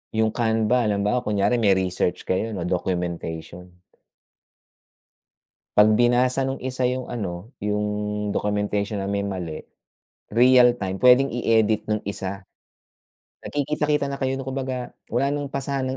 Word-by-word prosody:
yung 110 0 +2
Canva, 115 +1 +1
halimbawa, 105 +3 +1
kunyari 105 +2 +1
may 100 -4 +4
research 90 -1 -1
kayo 105 +4 -1
o 90 - -3
documentation. 90 0 -4 2.0
'Pag 105 +1 +6
binasa 125 +2 +3
nung 135 - -2
isa 130 -1 0
yung 125 0 -3
ano, 100 -1 -5
yung 105 0 -1 0.5
documentation 105 0 -1
na 100 - -3
may 100 0 -1
mali, 90 -5 -4 0.7
real 125 +2 +6
time, 95 -1 -3
puwedeng 125 +5 +5
i-edit 110 -3 +1
nung 105 - +1
isa, 100 -1 -4 1.0
nagkikita-kita 150 0 0
na 140 - -3
kayo, 135 -1 -2
kumbaga 130 -2 -4 0.2
wala 135 +4 +1
nang 145 -1 -4
pasahan 135 -1 -2
110 Hz, 125 wpm, -23 LUFS, 100-130 Hz, 2.0 s, Pag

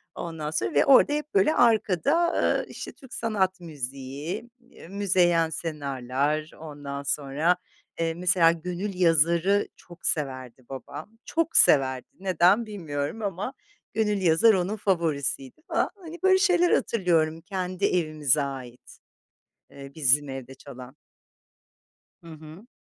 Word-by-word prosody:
ondan 160 -3 -5
sonra 115 -4 -2
ve 145 - +4
orada 275 +2 +6
hep 300 +3 -4
böyle 395 -6 +3
arkada, 235 - +3 0.2
ııı, - - +1
işte, - - -8
Türk 265 -4 -15
sanat 190 -5 -1
müziği, 140 - -6
eee, 240 -8 -16
Müzeyyen 180 -4 +2
Senar'lar, 145 -1 -3
ondan 145 -2 -7
sonra, 145 +5 0 0.4
eee, 165 0 0
mesela, 175 -1 +3
Gönül 180 +4 -4
Yazar'ı 170 +4 +3
çok 175 +1 -14
severdi 130 -4 -3
babam, 175 - -9
çok 330 0 0
severdi 130 -3 +4
neden 190 +4 +3
bilmiyorum 165 -3 -5
ama 200 +5 -3 0.4
Gönül 210 -2 0
Yazar 175 +6 +5
onun 190 +2 -1
favorisiydi 155 - -2
falan. - - 0
Hani, 345 -3 -11
böyle 380 0 +5
şeyler 355 -3 +3
hatırlıyorum 165 -6 +1
kendi 185 0 -3
evimize 155 -6 +1
ait, 130 -3 -8 0.7
eee, 140 0 -11
bizim 145 -1 +3
evde 135 0 -8
çalan. 130 -1 -12 1.3
Hı 165 - -11
hı. 160 +7 -12
165 Hz, 125 wpm, -26 LUFS, 145-200 Hz, 1.3 s, orada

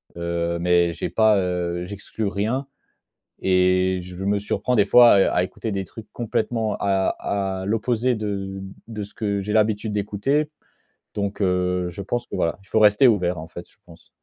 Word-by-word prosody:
Heu, 85 0 -2
mais 85 0 +2
j'ai - - -4
pas, 110 -2 +4
heu, 90 -2 -1
j'exclus 100 +3 -5
rien. 110 +7 -1 0.8
Et 95 0 +3
je 90 +1 -8
me 100 +1 +1
surprends 105 +4 -1
des 105 - +5
fois 120 +3 +8
à 95 - +5
à - - +4
écouter 100 +4 -4
des 95 -1 -2
trucs 110 +4 -11
complètement 115 -1 -1
à 95 -1 +1 0.5
à - - -5
l'opposé 115 +3 +1
de 100 -3 -4 0.2
de 110 -2 -6
ce 100 - -9
que 100 -2 -2
j'ai 100 +2 -4
l'habitude 110 0 +1
d'écouter. 105 +9 0 0.6
Donc, 100 0 -3
heu, 90 -1 +1
je 95 +3 -7
pense 120 +5 -3
que - - -6
voilà. 85 - -1
Il 100 - -23
faut 110 - +2
rester 105 +5 +6
ouvert 90 -6 +1
en 80 +1 -8
fait 85 +1 -9
je - - -26
pense. - - -17
100 Hz, 180 wpm, -23 LUFS, 90-110 Hz, 0.8 s, fois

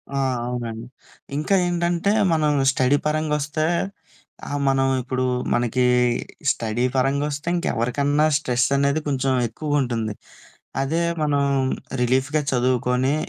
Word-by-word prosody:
ఆ! - - 0 0.3
అవునండి. 120 -2 -4 0.5
ఇంకా 155 +6 +1
ఏంటంటే, 175 +2 0 0.2
మనం 155 -2 +2 0.2
స్టడీ 130 +2 +2
పరంగొస్తే 150 0 -1 0.8
ఆహ్, 145 - -2
మనం 135 0 +3
ఇప్పుడూ 130 +1 -2 0.3
మనకీ 120 +1 +1 0.7
స్టడీ 115 +1 -2
పరంగొస్తే 140 +3 0
ఇంకెవరికన్నా 145 0 +1
స్ట్రెసనేది 140 +2 +1
కొంచెం 135 -1 0 0.2
ఎక్కువుంటుంది. 120 -4 -1 0.7
అదే 155 +5 0 0.2
మనం 145 -2 +1 0.6
రిలీఫ్‌గా 130 +5 +1
చదువుకోని, 125 +1 +1
135 Hz, 95 wpm, -22 LUFS, 125-150 Hz, 0.8 s, మనం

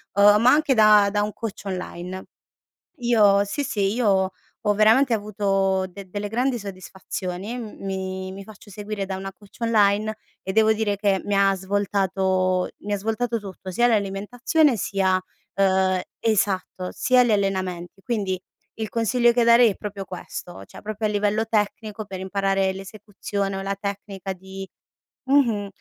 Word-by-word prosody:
uhm, 205 +1 +6
ma 245 +2 +6
anche 295 -2 +3
da 210 -2 +6
da 205 - +1
un 210 - -3
coach 220 -3 -6
online. 185 -1 -5 0.7
Io 210 -5 +4
sì, 245 +8 -3
sì, 200 -7 0
io 195 -6 +2 0.4
ho 210 - +4
veramente 225 +5 +5
avuto 195 -3 0
de - - -19
delle - - -26
delle 205 +2 -4
grandi 245 +3 0
soddisfazioni, 190 +1 -6
mhmm, 225 -5 -8
mi-mi 190 0 -4
faccio 215 0 -14
seguire 205 0 -5
da 190 0 -4
una 195 0 -6
coach 205 0 -19
online 215 -2 +2 0.3
e 190 - -4
devo 220 +1 +5
dire 215 -2 0
che 200 -1 +1
mi 205 - 0
ha 195 0 +4
svoltato 190 -1 0
mi 205 0 -2
ha - - +1
svoltato 225 +3 -1
tutto, 190 -1 -8
sia 240 +6 +3
l'alimentazione 230 +7 +1
sia, 190 -1 +1 0.3
uhm 190 -1 +2 0.2
esatto, 195 -4 0
sia 255 -1 +4
gli 235 - +1
allenamenti. 190 -3 -1
Quindi 195 -5 -2 0.3
il 220 -1 -3
consiglio 235 +1 +2
che 240 0 +3
darei 235 0 +6
è - - -7
proprio 200 -2 -6
questo 175 - -8
cioè - - -13
proprio 215 +1 -4
a - - -2
livello 210 +1 +1
tecnico 215 0 -2
per 190 -2 -7
imparare 195 0 0
l'esecuzione 195 0 -5
o 195 - -4
la 200 0 -2
tecnica 200 -1 -5
di 190 +1 -9 0.6
mh-mh, 235 -8 +3
200 Hz, 160 wpm, -23 LUFS, 190-220 Hz, 0.7 s, uhm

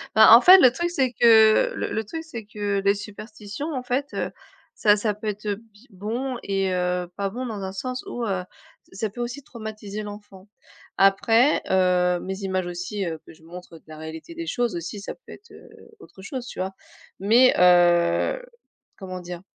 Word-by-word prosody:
Bah, 220 +1 +9
en 240 - +7
fait, 370 +1 +9
le 255 -7 +7
truc, 345 +6 -2
c'est 265 -7 0
que 225 - +5
le - - -3
le 220 - -2
truc 320 +10 -7
c'est 235 -9 -8
que 205 -1 -2
les 200 +1 +3
superstitions, 215 +7 -8
en 255 -2 -4
fait, 260 +3 -1
heu, - - -3 0.4
ça 210 -1 +4
ça 210 0 -1
peut 215 +1 -8
être, 210 +1 -4
heu, 205 -1 -1
bie 225 +2 -21
bon 235 +7 -4
et 195 -1 -1
heu, 180 0 -1
pas 200 -1 -2
bon 250 +5 -5
dans 215 -4 -5
un 190 - -4
sens 255 +5 -5
où, 240 -1 -4
heu, 190 -3 -1 0.4
ç - - -30
ça 215 +2 -3
peut 240 - -7
aussi 245 +4 -5
traumatiser 215 -3 -7
l'enfant. 205 -2 -11 0.5
Après, 225 +7 +4
heu, 180 -1 +2
mes 190 +1 -5
images 185 -2 -2
aussi, 180 +3 -4
heu, 160 -2 -4
que - - -14
je 160 - -22
montre 175 0 -11
de - - -22
la 155 - -11
réalité 160 - -9
des 335 0 -7
choses 240 - -1
aussi, 175 +4 -6
ça 200 - -6
peut - - -17
être, 420 - -14
heu, - - -15 0.3
autre 190 - -15
chose, 255 +2 -6
tu - - -9
vois? 190 +1 -2 0.5
Mais, 235 +6 +5
heu, 175 - +4 0.6
comment 185 -2 -7
dire? 175 0 -8
210 Hz, 205 wpm, -24 LUFS, 185-240 Hz, 0.6 s, Bah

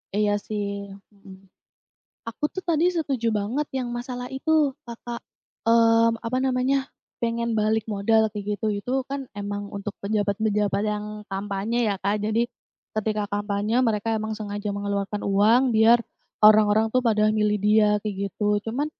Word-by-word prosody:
Iya 205 0 +2
sih, 200 -1 -4 0.2
mhm, 195 -2 -16 0.7
aku 230 +6 -6
tuh 375 - -4
tadi 335 0 +2
setuju 260 -8 -1
banget 225 +9 -1
yang 255 -2 -2
masalah 245 +1 -5
itu 300 +2 +2 0.2
Kakak, 235 0 -7 0.5
mmm, 230 0 +4
apa 245 +2 -1
namanya 265 +1 +1 0.3
pengen 235 -1 -1
balik 215 +1 +2
modal 220 +2 +2
kayak 210 0 -3
gitu 215 +1 -2
itu 245 +5 -5 0.2
kan 275 -1 -4
emang 205 0 -4
untuk 200 +1 -4
pejabat-pejabat 205 0 0
yang 210 0 -2 0.2
kampanye 205 +4 -1
ya 200 - -2
Kak, 200 +2 -1
jadi, 220 +3 +1 0.5
ketika 215 -1 -1
kampanye 205 +3 0
mereka 225 -1 0
emang 220 0 -2
sengaja 205 -1 -4
mengeluarkan 200 0 -3
uang 225 +6 +4
biar, 225 +2 +6 0.5
orang-orang 215 +1 +5
tuh 255 - +3
pada 215 -3 +3
milih 210 -1 +2
dia 210 +1 +4
kayak 210 -1 -4 0.2
gitu. 205 0 0
Cuman, 275 +6 -1
215 Hz, 145 wpm, -24 LUFS, 205-235 Hz, 0.7 s, biar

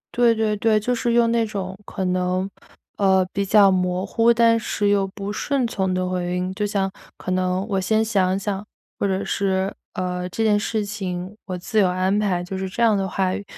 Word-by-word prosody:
对 240 -1 +5
对 220 -1 +1
对， 215 +1 +3
就 245 +4 -1
是 235 0 0
用 235 -1 +4
那 230 -1 +2
种 195 -3 -5
可 190 - -4
能， 185 +1 0 0.5
呃， 190 -2 +3
比 200 - 0
较 200 0 +5
模 180 0 0
糊 230 +3 +3
但 230 -1 +4
是 210 -2 -1
又 200 -1 +2
不 200 +1 -6
顺 275 +3 0
从 190 -5 -1
的 185 0 0
回 180 -1 -2
应。 180 +1 -2
就 205 +2 -1
像 195 -2 0 0.3
可 185 - -5
能 185 +1 0
“我 195 -3 0
先 220 +3 +2
想 190 -4 +1
想” 200 0 -3 0.4
或 - - +1
者 190 0 -1
是， 190 0 0 0.2
呃， 180 0 -3
“这 225 +5 -2
件 210 -2 +4
事 215 0 -1
情 190 -2 -5
我 185 -2 -4
自 195 +5 -1
有 195 - +5
安 185 +2 +1
排“， 185 -4 0
就 190 - -6
是 190 0 -3
这 210 - -5
样 225 -2 +5
的 195 -1 0
话 190 0 0
语。 - - -5
195 Hz, 230 characters per minute, -22 LUFS, 185-215 Hz, 0.5 s, 对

